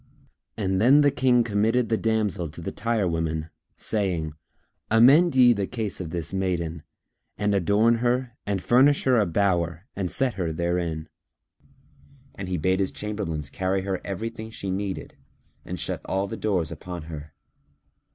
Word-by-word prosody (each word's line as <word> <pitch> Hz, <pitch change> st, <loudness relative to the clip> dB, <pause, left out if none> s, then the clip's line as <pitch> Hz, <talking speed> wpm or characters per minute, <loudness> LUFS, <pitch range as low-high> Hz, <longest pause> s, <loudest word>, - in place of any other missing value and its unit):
Then 110 Hz, +8 st, +4 dB
the 145 Hz, -1 st, +4 dB
King 125 Hz, -2 st, +3 dB
committed 115 Hz, +2 st, +1 dB
the 115 Hz, -, +3 dB
damsel 105 Hz, -6 st, 0 dB
to 75 Hz, -, -11 dB
the -, -, -4 dB
tire 115 Hz, -4 st, 0 dB
women, 80 Hz, -1 st, -2 dB, 0.3 s
saying, 90 Hz, -8 st, -1 dB, 0.6 s
"Amend 135 Hz, +9 st, +6 dB
ye 125 Hz, -2 st, +7 dB
the 100 Hz, -3 st, -2 dB
case 110 Hz, -6 st, -4 dB
of 85 Hz, -, -5 dB
this 85 Hz, -2 st, -4 dB
maiden[FN#304] 85 Hz, -4 st, -2 dB, 0.6 s
and 105 Hz, 0 st, +1 dB
adorn 100 Hz, +5 st, +3 dB
her 125 Hz, +1 st, 0 dB
and 100 Hz, -2 st, -2 dB
furnish 135 Hz, +4 st, +4 dB
her 130 Hz, -3 st, +4 dB
a 105 Hz, -, +2 dB
bower 85 Hz, -1 st, 0 dB
and 95 Hz, -3 st, -2 dB
set 130 Hz, +3 st, +1 dB
her 90 Hz, -4 st, -2 dB
therein." 85 Hz, -1 st, -2 dB, 1.3 s
And 95 Hz, -2 st, -6 dB
he 90 Hz, -, -1 dB
bade 95 Hz, +4 st, +1 dB
his 95 Hz, -, +1 dB
chamberlains 80 Hz, -9 st, -4 dB
carry 95 Hz, +1 st, -1 dB
her 95 Hz, -1 st, -2 dB
everything 110 Hz, +3 st, -5 dB
she 100 Hz, -3 st, -5 dB
needed 95 Hz, 0 st, -4 dB, 0.5 s
and -, -, -6 dB
shut -, -, -2 dB
all 95 Hz, +1 st, -1 dB
the 100 Hz, -, -5 dB
doors 95 Hz, -7 st, -1 dB
upon 90 Hz, -3 st, -7 dB
her. 75 Hz, -2 st, -9 dB
100 Hz, 155 wpm, -25 LUFS, 85-115 Hz, 1.3 s, ye